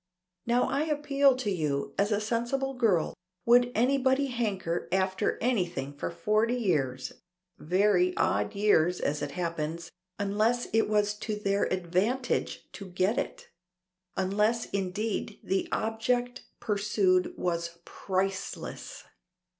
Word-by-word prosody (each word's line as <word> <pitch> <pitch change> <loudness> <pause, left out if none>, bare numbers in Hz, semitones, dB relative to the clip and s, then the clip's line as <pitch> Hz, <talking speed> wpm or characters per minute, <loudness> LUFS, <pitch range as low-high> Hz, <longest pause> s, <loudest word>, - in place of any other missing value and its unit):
Now 240 +1 +3
I 275 +4 0
appeal 285 -3 +3
to 255 -5 -2
you, 150 -6 -1
as 205 +2 +1
a 205 - +2
sensible 240 +5 -1
girl, 220 -10 +2 0.3
would 245 +1 +5
anybody 265 +3 +3
hanker 200 -8 -2
after 190 0 +1
anything 175 - -1
for 145 - -3
forty 215 +7 +1
odd 240 - -3
years 130 -2 -3 0.5
(very 180 +1 +2
odd 105 +1 +1
years 180 -4 +3
as 150 +1 -1
it 145 -1 -4
happens), 165 -1 -3 0.3
unless 215 +4 +1
it 225 -1 +3
was 210 -1 +2
to 215 -1 -3
their 200 -1 0
advantage 185 +8 -1
to 195 - -9
get 185 +4 +1
it; - - -5 0.7
unless, 210 +5 +1
indeed, 200 +3 -2
the 190 0 -1
object 245 +3 -1
pursued 200 -3 +1
was 170 -1 -2
priceless!" 195 0 -4
205 Hz, 120 wpm, -29 LUFS, 180-235 Hz, 0.7 s, would